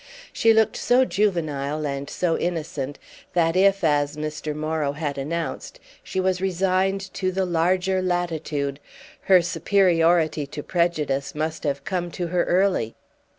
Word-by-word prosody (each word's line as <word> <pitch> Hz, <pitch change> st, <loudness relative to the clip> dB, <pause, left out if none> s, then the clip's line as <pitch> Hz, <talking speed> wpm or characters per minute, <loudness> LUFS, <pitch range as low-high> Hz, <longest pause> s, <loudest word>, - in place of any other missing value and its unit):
She 225 Hz, -, +4 dB
looked 220 Hz, -1 st, +3 dB
so 255 Hz, +2 st, +3 dB
juvenile 155 Hz, -, -1 dB
and 140 Hz, 0 st, -4 dB
so 170 Hz, -2 st, 0 dB
innocent 155 Hz, -5 st, -3 dB, 0.4 s
that 165 Hz, -1 st, +2 dB
if, 195 Hz, 0 st, +3 dB
as 145 Hz, -1 st, +1 dB
Mr. 155 Hz, 0 st, -4 dB
Morrow 155 Hz, -2 st, -1 dB
had 145 Hz, -1 st, -3 dB
announced, 165 Hz, +4 st, -4 dB, 0.2 s
she 190 Hz, -, -4 dB
was 185 Hz, -1 st, 0 dB
resigned 190 Hz, +1 st, 0 dB
to 185 Hz, -1 st, -1 dB
the 190 Hz, +1 st, 0 dB
larger 180 Hz, +2 st, +1 dB
latitude, 160 Hz, -6 st, -2 dB, 0.5 s
her 185 Hz, -2 st, +6 dB
superiority 170 Hz, -5 st, +2 dB
to 145 Hz, +1 st, -7 dB
prejudice 150 Hz, -6 st, -1 dB
must 155 Hz, +1 st, -3 dB
have 140 Hz, -1 st, -1 dB
come 180 Hz, -2 st, -2 dB
to 180 Hz, -, -3 dB
her 175 Hz, 0 st, +1 dB
early. 180 Hz, -, +1 dB
170 Hz, 140 wpm, -24 LUFS, 150-185 Hz, 0.5 s, her